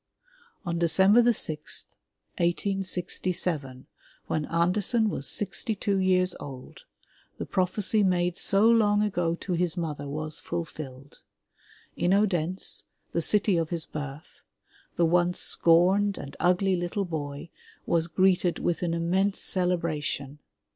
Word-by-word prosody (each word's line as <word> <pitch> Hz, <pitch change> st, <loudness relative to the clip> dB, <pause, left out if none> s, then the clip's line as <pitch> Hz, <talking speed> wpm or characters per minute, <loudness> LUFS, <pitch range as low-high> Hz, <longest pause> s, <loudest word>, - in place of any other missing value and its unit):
*' 475 Hz, -1 st, -32 dB
On 170 Hz, -1 st, -2 dB
December 190 Hz, +7 st, +5 dB
sixth, 155 Hz, -8 st, -1 dB, 0.4 s
1867, 175 Hz, -6 st, -2 dB, 0.4 s
when 155 Hz, -2 st, -2 dB
Andersen 200 Hz, +7 st, +1 dB
was 135 Hz, -, +2 dB
sixty 205 Hz, +2 st, -1 dB
two 200 Hz, 0 st, -1 dB
years 185 Hz, -1 st, +2 dB
old, 130 Hz, -2 st, -10 dB, 0.5 s
the -, -, -4 dB
prophecy 195 Hz, +3 st, 0 dB
made 180 Hz, -2 st, +1 dB
so 200 Hz, +3 st, +3 dB
long 210 Hz, -3 st, +4 dB
ago 175 Hz, -5 st, 0 dB
to 180 Hz, +1 st, -5 dB
his 175 Hz, 0 st, -1 dB
mother 150 Hz, -4 st, -4 dB
was 155 Hz, +2 st, -4 dB
fulfilled. 145 Hz, -5 st, -7 dB, 0.7 s
In 180 Hz, +2 st, +2 dB
Odense, 185 Hz, -3 st, 0 dB, 0.3 s
the 170 Hz, -, +1 dB
city 200 Hz, +2 st, +2 dB
of 165 Hz, -1 st, -1 dB
his 170 Hz, -2 st, -3 dB
birth, 145 Hz, 0 st, -8 dB, 0.5 s
the 170 Hz, -, +3 dB
once 175 Hz, +1 st, +2 dB
scorned 190 Hz, +4 st, +3 dB
and 140 Hz, -, -8 dB
ugly 185 Hz, +2 st, +2 dB
little 175 Hz, +3 st, -2 dB
boy 150 Hz, -2 st, -6 dB, 0.3 s
was 165 Hz, -1 st, +1 dB
greeted 180 Hz, 0 st, +2 dB
with 175 Hz, -, -1 dB
an 170 Hz, -2 st, -1 dB
immense 190 Hz, +4 st, 0 dB
celebration. 155 Hz, -6 st, -1 dB
175 Hz, 125 wpm, -27 LUFS, 160-195 Hz, 0.7 s, December